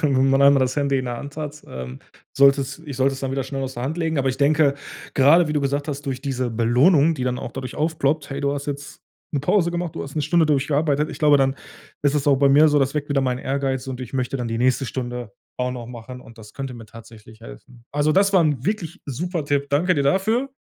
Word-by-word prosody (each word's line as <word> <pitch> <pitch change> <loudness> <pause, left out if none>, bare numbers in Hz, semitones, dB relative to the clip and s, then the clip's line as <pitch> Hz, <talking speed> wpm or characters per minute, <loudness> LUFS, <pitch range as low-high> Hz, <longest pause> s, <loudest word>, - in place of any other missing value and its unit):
Wenn 135 -3 +2
man 135 0 +3
einmal 140 0 +6
das 130 0 +1
Handy 140 -2 +1
in 130 - -3
der 120 -1 -4
Hand 145 +1 -9
hat, 150 -1 -6
ähm, 65 0 -8 0.4
solltest 140 0 +3
ich 140 -3 -6
sollte 135 +1 +2
es 135 - -7
dann 135 - -3
wieder 135 0 -1
schnell 135 0 -4
aus 130 0 -5
der 120 - -5
Hand 150 +6 -3
legen. 160 -1 -1
Aber 135 -1 +1
ich 130 - -6
denke, 145 0 +3 0.4
gerade 150 +5 +5
wie - - -1
du 150 - +1
gesagt 140 +2 -1
hast, 145 0 -5
durch 130 -1 -3
diese 130 -3 -2
Belohnung, 135 +8 +3
die 130 -4 -4
dann 125 0 -1
auch 120 - -7
dadurch 130 -1 -6
aufploppt: 155 -2 -1
„Hey, 140 0 -4
du 140 0 0
hast 140 0 -5
jetzt 145 0 -6 0.3
'ne 140 - +1
Pause 170 +4 +2
gemacht, 175 -1 -3
du - - -4
hast 140 - -9
'ne 150 - 0
Stunde 165 +2 +3
durchgearbeitet.“ 145 +1 +1
Ich - - -8
glaube, 150 -2 +5
dann 135 0 +1 0.5
ist 145 0 +2
es 145 -1 -1
auch 140 -1 +5
bei 140 +1 +4
mir 150 +3 +6
so, 150 0 +3
das 135 0 0
weckt 145 -1 -3
wieder 140 -1 +2
meinen 125 -2 -1
Ehrgeiz, 135 -1 -2
so, 135 - -6
und 130 0 -6
ich 130 0 -8
möchte 130 +1 -2
dann 120 -2 -3
die 115 - -2
nächste 130 +2 +1
Stunde 125 -3 -5 0.3
auch 125 0 -1
noch 120 -2 -7
machen, 125 +1 -9
und 115 -2 -16
das 105 -1 -13
könnte 135 -2 -5
mir 115 -2 -11
tatsächlich 110 0 -15
helfen. 120 0 -13
Also, 145 +1 +2
das 200 +3 +3
war 190 - +5
'n 145 -5 0
wirklich 200 -5 -3
super 165 +4 -3
Tipp. 140 -1 0
Danke 160 +6 +2
dir 145 - +1
dafür. 215 - +1
140 Hz, 260 wpm, -22 LUFS, 130-150 Hz, 0.5 s, einmal